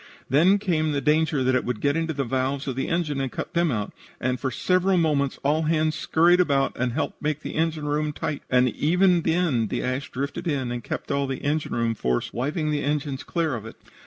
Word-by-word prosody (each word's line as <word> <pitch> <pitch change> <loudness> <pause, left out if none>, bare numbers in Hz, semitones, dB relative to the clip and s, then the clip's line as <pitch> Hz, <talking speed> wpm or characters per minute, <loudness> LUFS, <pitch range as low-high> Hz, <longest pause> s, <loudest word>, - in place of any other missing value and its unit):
Then 170 +9 +5
came 160 -6 0
the 140 - +1
danger 150 0 +2
that 130 +1 +2
it 130 - +2
would 125 -3 -3
get 140 +1 +1
into 165 0 0
the 140 -3 -1
valves 130 +2 -1
of 130 - -2
the 135 - -2
engine 155 -5 -1
and 135 -2 -2
cut - - -5
them 170 -2 +2
out, 105 -4 -3 0.3
and 125 0 -1
for 135 - -1
several 185 +7 +2
moments 145 -5 +1
all 150 +3 +2
hands 155 0 +1
scurried 175 +2 +3
about 140 -6 +2
and 125 -1 -1
helped 160 - -3
make 150 0 -1
the - - -6
engine 160 -1 -1
room 150 +1 0
tight, 145 0 -4
and 125 0 +4
even 175 - +3
then 160 -9 +1
the - - -2
ash 130 +2 -2
drifted 140 +5 -4
in 135 -6 -1
and 120 -1 -4
kept - - -5
all 140 0 0
the 135 -1 -4
engine 150 -1 -1
room 115 -1 +1
force 60 - -1
wiping 150 +5 -1
the 150 -1 0
engines 145 -2 -2
clear 165 -4 -1
of 115 -4 -4
it. - - -10
145 Hz, 225 wpm, -25 LUFS, 130-160 Hz, 0.3 s, Then